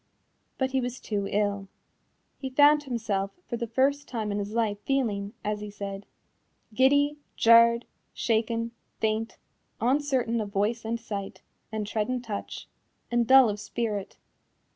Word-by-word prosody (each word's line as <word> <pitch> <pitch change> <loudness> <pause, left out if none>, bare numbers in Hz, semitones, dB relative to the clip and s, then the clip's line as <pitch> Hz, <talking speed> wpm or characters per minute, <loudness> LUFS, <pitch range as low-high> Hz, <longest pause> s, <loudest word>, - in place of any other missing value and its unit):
But 265 -1 0
he 265 0 +1
was 245 +1 -4
too 200 -2 -2
ill. 205 -1 0 0.7
He 265 - -4
found 290 +2 +5
himself 220 -6 -1 0.2
for 240 - -3
the 235 0 -3
first 275 +5 +1
time 220 -4 -3
in 205 - -1
his 205 0 -4
life 220 -3 0
feeling, 215 -7 -1
as 210 0 -1
he 210 - -6
said, 200 -1 -7 0.7
"giddy, 285 +4 +4 0.2
jarred, 235 +1 +6 0.3
shaken, 230 0 0 0.3
faint, 220 +1 -1 0.4
uncertain 255 -2 +1
of 210 - -4
voice 215 +3 -1
and 230 +1 -2
sight, 200 -3 -6 0.3
and 215 -1 -2
tread 215 +2 -2
and 250 -1 -2
touch, 210 -4 -6 0.4
and 240 -1 +2
dull 265 0 +8
of 210 -1 -2
spirit." 210 -1 -3
230 Hz, 145 wpm, -27 LUFS, 205-255 Hz, 0.7 s, dull